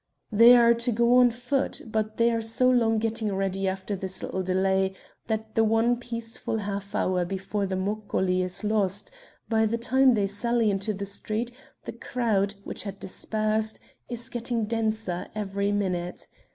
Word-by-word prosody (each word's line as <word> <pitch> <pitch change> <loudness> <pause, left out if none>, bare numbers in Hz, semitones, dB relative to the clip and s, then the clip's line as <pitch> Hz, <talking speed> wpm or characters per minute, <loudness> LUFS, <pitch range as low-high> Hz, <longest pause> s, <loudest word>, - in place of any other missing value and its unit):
They 230 +3 +8
are 235 0 +6
to 235 +1 +1
go 235 +2 +4
on 250 -1 +7
foot, 250 +4 -1
but 215 -1 -2
they 235 0 +4
are 230 -1 0
so 225 +3 +1
long 230 -3 +3
getting 220 -2 -1
ready 195 0 -1
after 190 +2 -2
this 190 0 -5
little 190 - -2
delay 190 +1 +1 0.3
that 220 -1 -3
the 225 - +3
one 225 +2 +3
peaceful 230 -2 -4
half 200 -1 -4
hour 180 -1 +1
before 195 +2 -3
the 190 - -2
moccoli 190 -2 0
is 185 +3 -4
lost; 205 - 0 0.4
by 220 -1 +2
the 230 +2 -1
time 260 +2 +4
they 205 -3 +2
sally 225 +2 +1
into 195 +2 -1
the 200 -1 -4
street 215 +4 -3 0.3
the - - -5
crowd, 220 -4 0
which - - -4
had 200 0 -6
dispersed, 215 +2 -2 0.3
is 240 -1 -4
getting 235 -1 -2
denser 220 -5 -2
every 200 -1 -1
minute. 180 -3 -2
215 Hz, 165 wpm, -26 LUFS, 195-230 Hz, 0.4 s, They